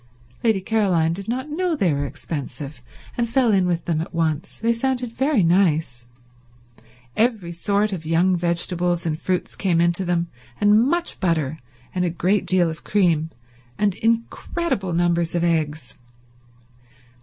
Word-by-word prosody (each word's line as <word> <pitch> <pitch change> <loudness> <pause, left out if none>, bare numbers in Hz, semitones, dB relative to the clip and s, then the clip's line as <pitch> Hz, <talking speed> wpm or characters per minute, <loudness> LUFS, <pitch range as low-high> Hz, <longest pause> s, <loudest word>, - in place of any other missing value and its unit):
Lady 220 -5 +2
Caroline 185 -7 +2
did 195 +2 -6
not 255 +4 -2
know 340 +3 -1
they 185 - +2
were 140 0 -1
expensive, 140 -1 -6 0.3
and 235 -1 -1
fell 245 -1 +3
in 190 -3 +3
with 175 -1 -1
them 160 -2 0
at 165 - -7
once. 160 +1 -1
They 230 +1 +1
sounded 245 0 -2
very 265 -4 +2
nice. 160 -8 +1 1.1
Every 220 -7 +1
sort 200 +4 0
of 170 -4 -5
young 170 +4 +2
vegetables 175 0 0
and 155 -1 -2
fruits 185 -1 -2
came 180 -4 +1
into 170 +2 +2
them, 175 -1 0 0.3
and 210 +1 +5
much 345 +1 -1
butter 160 -5 0 0.3
and 180 - 0
a 180 - +1
great 180 +4 0
deal 185 -2 +3
of 160 0 -6
cream 170 -6 +2 0.5
and 205 -2 +2
incredible 230 - -1
numbers 170 0 +1
of 170 - +1
eggs. 155 -6 -1
180 Hz, 150 wpm, -22 LUFS, 165-215 Hz, 1.1 s, and